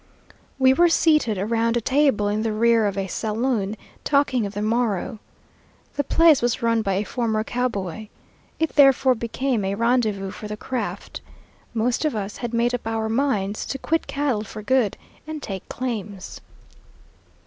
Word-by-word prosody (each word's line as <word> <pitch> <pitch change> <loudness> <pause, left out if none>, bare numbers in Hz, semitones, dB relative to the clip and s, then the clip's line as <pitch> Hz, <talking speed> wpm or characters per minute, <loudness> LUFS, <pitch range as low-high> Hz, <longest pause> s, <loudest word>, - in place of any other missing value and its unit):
We 260 -1 +5
were 345 +5 +4
seated 305 -10 +3
around 230 +4 +1
a - - +2
table 265 -4 +2
in 210 +1 0
the 225 0 -1
rear 230 0 +3
of 200 -1 -3
a 195 - -1
saloon 215 +1 -1 0.3
talking 270 -6 +2
of 200 - -10
the 205 - -2
morrow. 220 -2 -1 0.7
The 285 - -1
place 325 +1 +5
was 240 -1 0
run 230 -1 +2
by 195 -3 -1
a 200 - 0
former 220 -1 -1
cowboy. 220 -5 -3 0.5
It 320 0 0
therefore 270 -2 +6
became 235 0 -2
a 195 +1 -1
rendezvous 220 -4 +1
for 210 +1 -8
the 210 0 -5
craft. 255 +3 -5 0.5
Most 235 +5 0
of 305 -6 0
us 205 -1 -4
had 240 -2 -4
made 235 +1 +1
up 245 -2 -3
our 225 -1 -1
minds 220 -5 0
to 270 - -3
quit 325 +4 -1
cattle 275 -7 -1
for 215 0 -9
good 250 -3 +1 0.3
and 310 -1 -5
take 195 -9 -7
claims. 210 -6 -5
230 Hz, 165 wpm, -23 LUFS, 210-260 Hz, 0.7 s, therefore